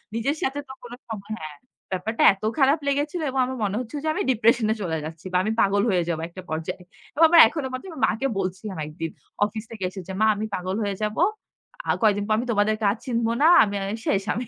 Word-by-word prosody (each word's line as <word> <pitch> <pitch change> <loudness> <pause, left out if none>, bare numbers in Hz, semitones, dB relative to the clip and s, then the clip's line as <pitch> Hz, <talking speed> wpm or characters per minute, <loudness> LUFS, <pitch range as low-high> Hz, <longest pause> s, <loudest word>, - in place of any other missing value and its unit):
নিজের 270 +7 0
সাথে 275 +2 -1
তো 265 - -8
কোনো 245 0 -8
সময় 215 -1 -7
হ্যাঁ, 155 -1 -8 0.4
ব্যাপারটা 210 +5 -2
এত 195 - -17 0.2
খারাপ 275 +3 +4
লেগেছিল 290 +4 0
এবং 265 0 -2
আমার 260 0 -5
মনে 200 0 -1
হচ্ছিল 250 +4 -6
যে 315 - +1
আমি - - -2
ডিপ্রেশনে 225 -1 +3
চলে 165 -4 -1
যাচ্ছি 160 +2 -9
বা - - +4
আমি 215 - 0
পাগল 200 0 +3
হয়ে 180 -3 +2
যাব 160 - -1
একটা 185 +2 -9
পর্যায়ে। 160 +3 -4 0.3
এবং 315 - +3
আমার 335 0 +9
এখনো 280 +2 -3
মনে 255 - -5
আছে 325 -7 -8
মাকে 230 +5 0
বলছিলাম, 190 +1 -4
একদিন 160 +1 -5 0.4
অফিস 215 +1 -5
থেকে 215 -4 -7
এসে 190 +1 -8
যে, 190 - -5
মা 220 - +5
আমি 215 +2 -3
পাগল 185 +1 -2
হয়ে 200 -1 -2
যাব, 210 0 -1 0.7
আর - - +2
কয়েকদিন 205 -2 +3
পর 215 - +2
আমি 240 - -1
তোমাদের 210 0 +2 0.2
আর 220 - -4
চিনব 235 -3 0
না, 310 - +6 0.2
আমি 205 - -2
আর 195 - -3
এ - - -8
শেষ 195 0 +2
আমি। 240 +3 -3
215 Hz, 230 wpm, -24 LUFS, 190-255 Hz, 0.7 s, আমার